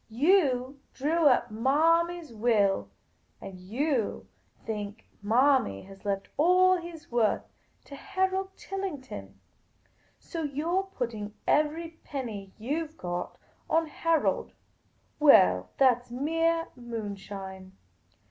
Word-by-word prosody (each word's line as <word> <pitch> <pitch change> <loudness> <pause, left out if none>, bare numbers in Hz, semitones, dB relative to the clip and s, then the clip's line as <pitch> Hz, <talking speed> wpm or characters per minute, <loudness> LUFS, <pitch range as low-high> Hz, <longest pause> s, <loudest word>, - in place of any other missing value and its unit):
You 270 - +2 0.2
drew 310 +3 +2
up 245 -3 +3
Marmy's 325 +6 +2
will; 210 - +2 0.5
and 190 -1 -9
you 235 +5 -1 0.4
think 210 -1 -5 0.2
Manny 235 - +3
has 195 0 -14
left 195 -1 -1
all 365 +4 +5
he 345 -1 -5
's 310 - -16
worth 235 -3 +2 0.4
to 280 - -10
Harold 380 +5 -2
Tillington; 280 - -6 0.8
so 335 - -6
you 295 +2 -2
're 385 - +2
putting 230 - -5
every 320 +2 0
peiui} 225 -8 -5
you 295 +9 -2
've 315 +2 -26
got 175 0 -4 0.3
on 325 +1 +3
Harold. 325 +1 0 0.7
Well, 90 - +6
that 250 -2 +4
's - - -19
mere 330 +5 0
moonshine. 200 -5 -7
265 Hz, 110 wpm, -28 LUFS, 210-330 Hz, 0.8 s, Well